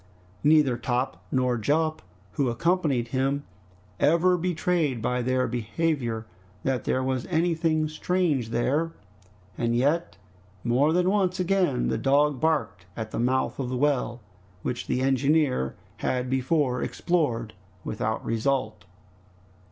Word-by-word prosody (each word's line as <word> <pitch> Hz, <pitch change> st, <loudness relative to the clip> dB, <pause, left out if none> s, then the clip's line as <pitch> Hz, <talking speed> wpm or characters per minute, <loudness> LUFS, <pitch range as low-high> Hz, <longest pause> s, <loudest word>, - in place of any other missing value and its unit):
Neither 150 Hz, -5 st, +4 dB
Top 120 Hz, -8 st, -2 dB
nor 125 Hz, -2 st, +1 dB
Jup, 155 Hz, +7 st, +1 dB, 0.3 s
who 135 Hz, -3 st, 0 dB
accompanied 145 Hz, -3 st, +1 dB
him, 135 Hz, +2 st, 0 dB, 0.6 s
ever 170 Hz, +3 st, +4 dB
betrayed 170 Hz, -6 st, 0 dB
by 125 Hz, +2 st, -1 dB
their 130 Hz, +1 st, +1 dB
behavior 120 Hz, -1 st, -1 dB, 0.4 s
that 130 Hz, -2 st, -1 dB
there 130 Hz, -, +1 dB
was 130 Hz, -2 st, -1 dB
anything 165 Hz, -2 st, +1 dB
strange 155 Hz, -6 st, 0 dB
there, 145 Hz, +8 st, 0 dB, 0.7 s
and 115 Hz, 0 st, +1 dB
yet 145 Hz, -, +1 dB, 0.5 s
more 130 Hz, +6 st, +3 dB
than 180 Hz, +2 st, +2 dB
once 190 Hz, -2 st, +1 dB
again 180 Hz, -, +1 dB
the 65 Hz, -, -1 dB
dog 145 Hz, 0 st, +3 dB
barked 155 Hz, -, 0 dB
at 110 Hz, -1 st, -4 dB
the -, -, -3 dB
mouth 130 Hz, +3 st, 0 dB
of 130 Hz, -2 st, -2 dB
the 130 Hz, -, -2 dB
well, 125 Hz, -3 st, 0 dB, 0.4 s
which 125 Hz, -, -3 dB
the 125 Hz, -, 0 dB
engineer 135 Hz, -, +2 dB, 0.2 s
had 125 Hz, +2 st, -1 dB
before 130 Hz, -1 st, +1 dB
explored 120 Hz, -11 st, -1 dB, 0.3 s
without 110 Hz, +1 st, -3 dB
result. 130 Hz, +4 st, -1 dB
135 Hz, 125 wpm, -26 LUFS, 120-160 Hz, 0.7 s, Neither